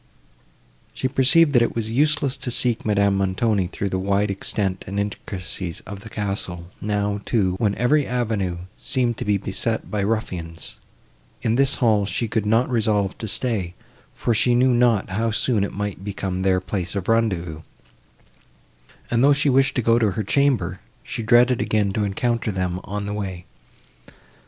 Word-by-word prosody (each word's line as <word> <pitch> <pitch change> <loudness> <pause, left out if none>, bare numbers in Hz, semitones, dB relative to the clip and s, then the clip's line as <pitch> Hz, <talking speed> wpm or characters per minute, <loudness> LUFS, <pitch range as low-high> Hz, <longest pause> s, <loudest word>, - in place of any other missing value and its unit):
She 130 - -1
perceived, 145 +5 +4
that 120 -4 +4
it 120 - +1
was 110 -1 -2
useless 145 +1 +2
to 135 -1 -5
seek 120 -1 0
Madame 100 -2 +2
Montoni, 95 +1 +1
through 100 +2 -3
the 95 - -1
wide 100 +1 +1
extent 95 -1 -2
and 100 +2 -2
intricacies 95 -3 -5
of 100 -1 -8
the 110 +2 -11
castle, 95 -4 -4
now, 105 -1 -1
too, 95 -6 +1
when 105 -3 +1
every 140 +4 +2
avenue 110 -8 -1 0.2
seemed 120 -3 0
to - - -3
be 105 -1 +2
beset 100 +4 -3
by 105 -2 0
ruffians; 90 -6 -3 0.7
in 110 - +2
this 135 +3 +3
hall 110 -5 +2
she 115 - -1
could 110 -1 -1
not 115 +4 +3
resolve 105 -5 +1
to 110 - -4
stay, 100 -5 -1 0.4
for 120 - 0
she 120 +2 +3
knew 125 +1 +4
not 120 -4 +3
how 115 +4 0
soon 110 -1 +1
it 100 - -2
might 100 -2 -4
become 95 -2 -3
their 95 -1 +3
place 90 -1 -4
of 95 -2 -3
rendezvous; 95 -9 0 1.5
and, 120 +1 +3
though 145 +1 +6
she 145 +1 +2
wished 135 0 +3
to 125 - 0
go 115 +1 +4
to 110 -3 +3
her 110 - -2
chamber, 140 +3 +1 0.2
she - - -5
dreaded 120 +2 +4
again 105 -2 +1
to 105 - 0
encounter 115 +3 -1
them 90 -2 -2
on 100 +1 -4
the 105 - -3
way. 95 -4 -5
105 Hz, 170 wpm, -22 LUFS, 95-120 Hz, 1.5 s, though